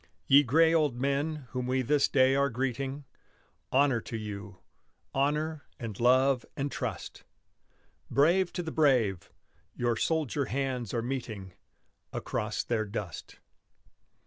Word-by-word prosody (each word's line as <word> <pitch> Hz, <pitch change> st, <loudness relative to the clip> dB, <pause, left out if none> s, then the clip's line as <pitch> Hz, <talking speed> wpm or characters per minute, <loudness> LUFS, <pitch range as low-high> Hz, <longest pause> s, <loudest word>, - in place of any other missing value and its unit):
Ye 140 Hz, +6 st, +7 dB
gray 160 Hz, +5 st, +4 dB
old 150 Hz, -7 st, +2 dB
men 140 Hz, +1 st, -1 dB
whom 125 Hz, -1 st, -3 dB
we 130 Hz, 0 st, +1 dB
this 145 Hz, +3 st, +3 dB
day 130 Hz, -1 st, +4 dB
are 140 Hz, 0 st, +2 dB
greeting, 135 Hz, +3 st, -3 dB, 0.7 s
Honor 135 Hz, -3 st, +3 dB
to 115 Hz, -, -6 dB
you, 105 Hz, -2 st, -7 dB, 0.6 s
honor 150 Hz, +2 st, 0 dB
and 110 Hz, -5 st, -6 dB
love 130 Hz, +1 st, +4 dB
and 140 Hz, +1 st, -2 dB
trust! -, -, -5 dB, 0.9 s
Brave 175 Hz, +6 st, +3 dB
to 175 Hz, -, -3 dB
the 160 Hz, -, -5 dB
brave. 120 Hz, -, +2 dB, 0.5 s
Your 120 Hz, -1 st, 0 dB
soldier 145 Hz, +1 st, 0 dB
hands 130 Hz, -2 st, -2 dB
are 115 Hz, -2 st, -1 dB
meeting 110 Hz, -7 st, -5 dB, 0.6 s
Across 105 Hz, 0 st, -2 dB
their 110 Hz, -2 st, -1 dB
dust. 100 Hz, -5 st, -6 dB
130 Hz, 125 wpm, -29 LUFS, 115-145 Hz, 0.9 s, Ye